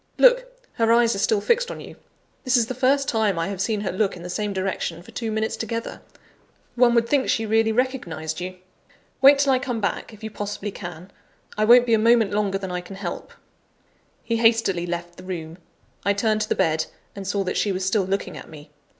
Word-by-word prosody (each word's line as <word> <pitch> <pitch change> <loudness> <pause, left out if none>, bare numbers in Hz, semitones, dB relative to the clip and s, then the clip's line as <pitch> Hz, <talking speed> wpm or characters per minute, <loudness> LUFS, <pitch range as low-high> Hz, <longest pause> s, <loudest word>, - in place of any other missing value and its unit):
Look! - - +5 0.3
her 230 0 +3
eyes 235 0 +4
are 195 - -3
still 205 +1 +2
fixed 480 - +1
on - - -6
you. - - -10 0.5
This 255 -1 +3
is 235 - +3
the 255 - -4
first 270 +2 +2
time 215 -5 +1
I 165 +3 -1
have 195 -2 -4
seen 210 0 0
her 205 - -2
look 195 0 0
in 170 - -10
the 180 - -6
same 210 +2 -2
direction 185 -3 -3
for - - -14
two 225 -2 -4
minutes 220 0 -1
together; 230 +1 -5 0.7
one 240 -1 +4
would 235 0 +3
think 275 +1 +1
she 225 - +1
really 220 +1 +2
recognised 180 - -2
you. 185 +1 -5 0.7
Wait 275 +1 +8
till 280 -1 +3
I 255 - +2
come 250 -3 -3
back, 200 +1 -2
if 215 0 -15
you 220 - -5
possibly 205 0 -5
can 175 +1 -9 0.4
I 215 - +1
won't 240 +2 +7
be 230 - +1
a 220 - +4
moment 230 -1 +4
longer 205 -1 0
than 190 -2 -6
I 180 0 -3
can 180 +2 -10
help." 190 -3 -6 0.9
He 230 - -1
hastily 225 -6 +2
left 175 0 -5
the 185 - -11
room. 170 -2 -6 0.4
I 200 - +2
turned 215 +1 +1
to 215 - -2
the - - +1
bed, 160 0 +1 0.3
and 195 -1 -7
saw 200 0 0
that 185 - -3
she 205 - +1
was 185 0 -2
still 195 +1 +2
looking 195 +1 -2
at - - -10
me. 150 -2 -13
210 Hz, 225 wpm, -23 LUFS, 185-230 Hz, 0.9 s, Wait